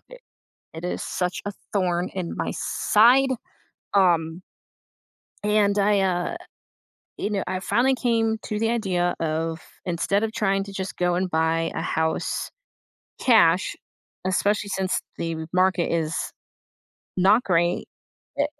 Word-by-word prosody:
i - - -15 0.6
it 160 - -8
is 180 - -3
such 180 0 -2
a 205 - -2 0.2
thorn 180 -2 0
in 180 -3 -4
my - - -2
side, 250 +5 +4 0.6
um 170 -3 +2 1.0
and 210 -1 +2
I, 205 0 +3
uh 185 - 0 0.8
you - - -2
know, 205 -2 -1
I 185 0 -2
finally 240 +8 +2
came 225 -3 +1
to 210 - -3
the 225 +1 +1
idea 185 -6 0
of, 160 0 -2 0.2
instead 180 +4 0
of 225 - -1
trying 195 -3 +1
to 200 0 -10
just 190 -1 -5
go 180 0 +1
and 180 +1 0
buy 165 0 +1
a - - -2
house 160 0 -1 0.7
cash, 190 -7 +4 0.5
especially 200 +2 +1
since 190 -1 0 0.2
the 165 -1 -3
market 185 -1 +2
is 165 -1 0 1.0
not 200 +6 +5
great 175 -1 +1 0.5
eh - - +4
185 Hz, 130 wpm, -24 LUFS, 170-210 Hz, 1.0 s, not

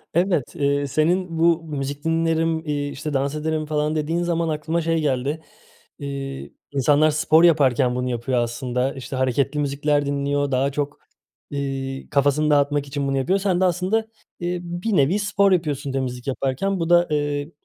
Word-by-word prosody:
Evet, 175 -6 +1
ııı, 140 -2 +1
senin 165 +4 0
bu 165 0 +3
müzik 145 -2 -5
dinlerim, 165 0 +1
iii, 145 -1 -2
işte 150 +2 -5
dans 140 +1 0
ederim 155 0 -2
falan 150 0 -1
dediğin 160 +3 -1
zaman 170 -1 0
aklıma 160 +2 -1
şey 165 0 0
geldi, 145 +2 -1 0.6
iii, 140 -1 -6 0.2
insanlar 145 +3 +3
spor 155 +2 +4
yaparken 130 -7 +4
bunu 125 0 -1
yapıyor 120 +1 -1
aslında. 125 +2 -1
İşte 135 0 -7
hareketli 130 +3 0
müzikler 145 +1 0
dinliyor, 140 0 -1
daha 135 +2 +1
çok, 145 +1 -3 0.5
ııı, 135 -1 -4
kafasını 145 +2 +2
dağıtmak 145 0 +2
için 140 0 -2
bunu 135 0 0
yapıyor. 180 +9 +1
Sen 190 -2 0
de - - +4
aslında, 185 +4 +1
ııı, 215 -5 -5
bir 175 +5 -2
nevi 160 +7 +3
spor 200 -1 +2
yapıyorsun 150 -6 0
temizlik 125 -2 -3
yaparken. 140 +9 -1
Bu 165 - -1
da, 175 0 +5
ııı, 145 0 -1
145 Hz, 165 wpm, -22 LUFS, 140-165 Hz, 0.6 s, da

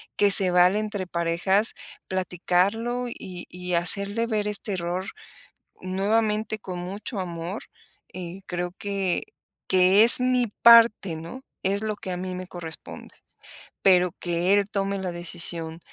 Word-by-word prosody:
que 205 -1 +3
se 190 -2 +8
vale 180 +3 +4
entre 210 -3 -4
parejas 180 +5 0 0.3
platicarlo 190 +7 -1
y 180 -5 -9
y 180 0 -7
hacerle 200 +6 +3
ver 215 -3 -2
este 210 0 -2
error 180 +1 -4 0.8
nuevamente 215 +3 -1
con 185 -3 -8
mucho 195 +4 -6
amor. 175 +2 -6 0.5
Eh, 180 +1 -8
creo 175 0 -4
que 195 -3 -2 0.4
que 185 +2 +4
es 240 +2 +9
mi 250 -1 +1 0.2
parte, 230 -7 +6
¿no?, 170 +12 -10 0.2
es 200 +2 0
lo 215 -1 -3
que 190 - -8
a - - -4
mí 185 0 -5
me 185 0 -7
corresponde. 170 -3 -10 0.7
Pero 180 -2 +3
que 175 +2 0
él 200 -1 +2
tome 195 -1 -2
la 185 -2 -4
decisión 170 -1 -4
185 Hz, 140 wpm, -24 LUFS, 180-210 Hz, 0.8 s, es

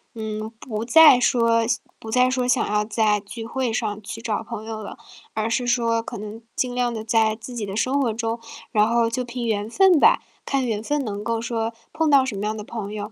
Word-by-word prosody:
嗯， 215 -1 -4
不 220 -2 -4
再 300 0 +8
说 230 -2 +3 0.4
不 220 - -9
再 250 +2 +3
说 255 -1 0
想 250 - +2
要 210 0 +1
在 215 -1 +2
聚 225 +3 -8
会 245 -1 -2
上 215 -3 -2
去 225 +3 -7
找 220 -2 -2
朋 215 -1 -7
友 220 -1 -6
了， 205 - -8 0.4
而 220 +1 -1
是 245 +1 0
说 230 -2 +2
可 235 0 -7
能 215 +2 -8
尽 250 -1 -1
量 245 -1 0
地 220 -1 -5
在 220 -1 +2
自 245 +2 -8
己 220 -4 -3
的 195 - -6
生 265 +5 +1
活 235 -4 +1
中， 225 +1 -2 0.3
然 215 -2 +3
后 230 0 +2
就 250 +2 -2
凭 240 0 -5
缘 210 -1 -1
分 370 +5 +5
吧， - - +5 0.2
看 270 -2 0
缘 215 -3 -1
分 290 +4 -1
能 205 -2 -4
够 230 +1 -2
说 230 -1 -2 0.2
碰 315 -1 +1
到 275 -2 +6
什 225 -7 -4
么 205 - -3
样 215 - -1
的 210 - -6
朋 210 -1 -6
友， 210 0 -5
230 Hz, 245 characters per minute, -23 LUFS, 215-245 Hz, 0.4 s, 再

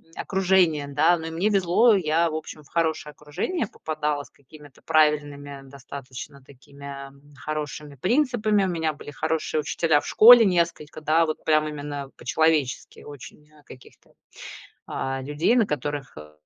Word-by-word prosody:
окружения. 185 -6 +1
Да, 155 +5 +3
но 160 0 -7
и - - -6
мне 175 +6 0
везло. 200 +3 +4
Я, 165 -2 +1
в 155 - -5
общем, 155 -1 -8
в 140 - -23
хорошее 160 -2 -1
окружение 150 - -4
попадала 150 -5 -3
с - - -18
какими-то 145 0 -18
правильными, 150 -2 +3 0.4
достаточно 135 0 -10
такими 140 +1 -11 0.2
хорошими 150 -1 -6
принципами. 215 - +1
У - - -1
меня 160 -3 -1
были 145 0 -11
хорошие 155 0 -2
учителя 160 0 +1
в - - -9
школе 235 +1 +8
несколько, 170 -5 -1
да, 160 +2 +3
вот, 155 -1 -5
прям 155 -1 +2
именно 145 -2 -6
по-человечески 145 +2 0
очень, 145 +1 -13
э, 150 -1 -22
каких-то, 125 - -17 0.7
а, 135 0 -4
людей, 150 - +1
на 230 -4 +3
которых, 145 -2 -4
э, 75 0 -12
155 Hz, 150 wpm, -24 LUFS, 145-170 Hz, 0.7 s, школе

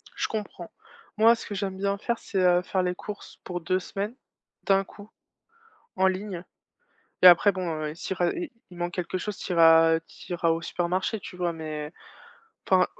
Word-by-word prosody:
Je - - -1
comprends. 205 -5 -6 0.5
Moi, 225 +2 +6
ce - - -9
que 205 - -6
j'aime 190 -1 -3
bien 200 +1 0
faire, 235 +3 -2
c'est, 200 - -5
heu, 180 -1 +4
faire 185 +1 -1
les 180 0 -1
courses 210 +3 -9
pour 175 -1 -5
2 185 +3 0
semaines, 200 +5 -5 0.5
d'un 195 0 +3
coup, 205 +1 -14 0.9
en 190 0 +3
ligne 190 -1 -3 0.8
et 185 - +10
après 180 +3 +7
bon, 185 -1 -3 0.2
heu, 150 0 -4
s'il 185 +2 -5
res 175 -1 +1
il 350 -3 -4 0.2
il 180 - -13
manque 175 0 -3
quelque 180 +1 -2
chose 205 +2 -5
tu 180 - -4
iras 165 -1 +6
tu 170 - -10
iras 170 -1 +1
au 165 0 +1
supermarché, 180 +5 -1
tu 180 - -9
vois, 175 -1 -1
mais 155 -1 -6 0.8
enfin, 185 -1 +5
185 Hz, 190 wpm, -26 LUFS, 175-200 Hz, 0.9 s, et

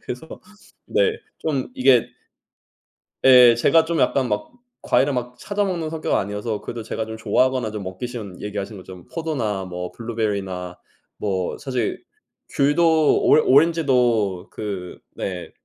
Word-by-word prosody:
그래서 125 +6 -8 0.5
네 470 -3 +2 0.3
좀 140 -5 -2
이게 130 -2 +3 1.1
예. 125 -2 +8
제가 160 +7 +4
좀 170 0 -1
약간 135 -2 +2
막 105 0 -2 0.3
과일을 140 +1 +2
막 125 0 -4
찾아 205 +7 -2
먹는 175 -5 -2
성격은 160 -1 0
아니어서 105 +2 -3
그래도 115 -1 -6
제가 110 0 -4
좀 110 0 -7
좋아하거나 130 0 +1
좀 105 -2 -5
먹기 95 +6 -5
쉬운 110 -7 -8
얘기하신 105 0 -5
것처럼 90 -1 -12
포도나 120 - -2
뭐 90 0 -6
블루베리나 100 -6 -3 0.4
뭐 95 -3 -2
사실 130 -5 -3 0.5
귤도 155 +2 +3
오 - - +2 0.2
오렌지도 125 - +3
그 100 -4 -6 0.2
네. 90 -2 -5
120 Hz, 280 characters per minute, -22 LUFS, 100-140 Hz, 1.1 s, 예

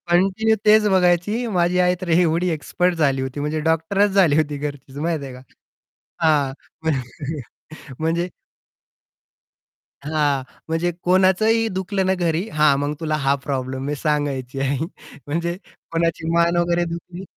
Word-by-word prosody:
Continue 195 +5 +3
तेच 215 0 +6
बघायची, 185 +5 +2
माझी 175 +1 +2
आई 180 0 +3
तर 185 - -5
एवढी 170 +1 +3
एक्सपर्ट 175 +3 0
झाली 140 -5 +1
होती, 130 +2 -4
म्हणजे 150 +2 -1
डॉक्टरच 180 +6 +2
झाली 185 -7 +4
होती 150 -2 0
घरचीच 140 -1 -6
माहिती 155 -1 -2
आहे 130 - -8
का? 125 - -11 0.8
हां, 145 -4 +3 0.3
म्हण 155 -5 +1 1.0
म्हणजे 165 +3 0 1.8
हां, 145 -3 +1 0.3
म्हणजे 165 +2 0 0.2
कोणाचंही 190 +5 +3
दुखलं 190 +1 -1
ना, 190 - +3
घरी, 165 +5 0
हां, 150 -2 +3
मग 145 +1 -1
तुला 155 -2 -1
हा 140 +1 +4
प्रॉब्लेम 130 -1 -3
मी 145 +1 -2
सांगायची 140 -4 -2
आई. 135 +1 0 0.5
म्हणजे 170 +3 -1 0.4
कोणाची 165 -1 -1
मान 170 0 +3
वगैरे 175 0 +2
दुखली 175 +2 -8
165 Hz, 140 wpm, -21 LUFS, 145-180 Hz, 1.8 s, तेच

